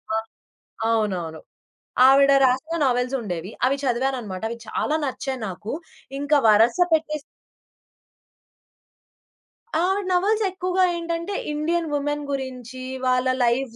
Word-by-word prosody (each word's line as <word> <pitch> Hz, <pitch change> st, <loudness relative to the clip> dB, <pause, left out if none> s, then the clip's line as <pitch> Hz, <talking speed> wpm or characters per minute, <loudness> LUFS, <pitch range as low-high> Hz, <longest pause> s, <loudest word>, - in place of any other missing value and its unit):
ఆ! -, -, +2 dB, 0.7 s
అవునవును. 185 Hz, -8 st, -1 dB, 0.7 s
ఆవిడ 275 Hz, +1 st, +6 dB
రాసిన 265 Hz, +6 st, +1 dB
నవెల్స్ 250 Hz, 0 st, +1 dB
ఉండేవి. 180 Hz, -4 st, -5 dB, 0.2 s
అవి 270 Hz, +2 st, +2 dB
చదివానన్నమాట. 245 Hz, -6 st, -1 dB
అవి 235 Hz, -, -4 dB
చాలా 305 Hz, -, 0 dB
నచ్చాయి 265 Hz, -1 st, -3 dB
నాకు. 195 Hz, +4 st, -6 dB, 0.5 s
ఇంకా 285 Hz, +1 st, +2 dB
వరస 220 Hz, +3 st, +5 dB, 0.2 s
పెట్టేసి 305 Hz, -1 st, +1 dB, 2.6 s
ఆవిడ 385 Hz, +3 st, +1 dB
నవల్స్ 410 Hz, +5 st, +2 dB
ఎక్కువగా 370 Hz, 0 st, 0 dB
ఏంటంటే, 335 Hz, +3 st, -3 dB, 0.2 s
ఇండియన్ 325 Hz, +2 st, -1 dB
వుమెన్ 290 Hz, +1 st, -1 dB
గురించి, 260 Hz, -2 st, -5 dB, 0.2 s
వాళ్ళ 255 Hz, 0 st, +2 dB, 0.2 s
లైఫ్ 240 Hz, 0 st, 0 dB
270 Hz, 105 wpm, -23 LUFS, 235-315 Hz, 2.6 s, ఆవిడ